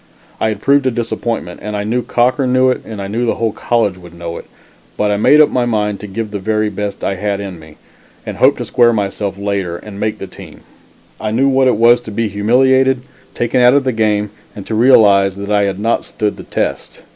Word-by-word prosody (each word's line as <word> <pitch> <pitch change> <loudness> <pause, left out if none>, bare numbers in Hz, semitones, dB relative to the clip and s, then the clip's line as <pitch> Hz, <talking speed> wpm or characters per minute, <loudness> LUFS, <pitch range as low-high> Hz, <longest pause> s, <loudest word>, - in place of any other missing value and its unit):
I - - +1
had 105 -2 -4
proved 140 -1 +3
a - - +4
disappointment, 115 -5 -3
and 105 0 -4
I 100 - -2
knew 115 +4 -1
Cochran 125 +2 +1
knew 130 0 +4
it - - -3
and 110 -2 -8
I 100 - -4
knew 115 +4 -2
the - - +1
whole 115 -1 -1
college 105 -4 -1
would 85 -1 -14
know 85 0 -6
it, - - -10 0.5
but 105 0 +1
I 100 - +1
made 145 +8 +5
up 155 - +6
my 125 -1 0
mind 105 -3 -1
to 105 - -8
give 110 +2 -5
the 100 - -4
very 110 +2 0
best 100 0 -5
I 95 - -1
had 100 +1 -2
in 95 -4 -7
me, 80 -1 -15 0.5
and - - -6
hoped - - +4
to - - -4
square 120 -1 +3
myself 100 -2 -2
later 100 -4 -2
and 100 +1 -10
make 110 0 -2
the - - -7
team. - - -13 0.6
I 110 - -3
knew 125 +6 +2
what 135 -1 +3
it 125 - +2
was 120 +2 +5
to 115 - -9
be 110 +1 -1
humiliated, 130 +5 +2 0.3
taken 120 +1 +1
out 125 +2 +6
of 140 -1 +2
a 130 - +1
game, 105 -2 0 0.2
and 100 - -8
to - - -5
realize 105 -5 +5
that 100 +1 -6
I 105 -1 +3
had 100 -1 -3
not 115 +3 0
stood 105 -2 -3
the - - -9
test. - - -4
110 Hz, 240 wpm, -16 LUFS, 100-120 Hz, 0.6 s, up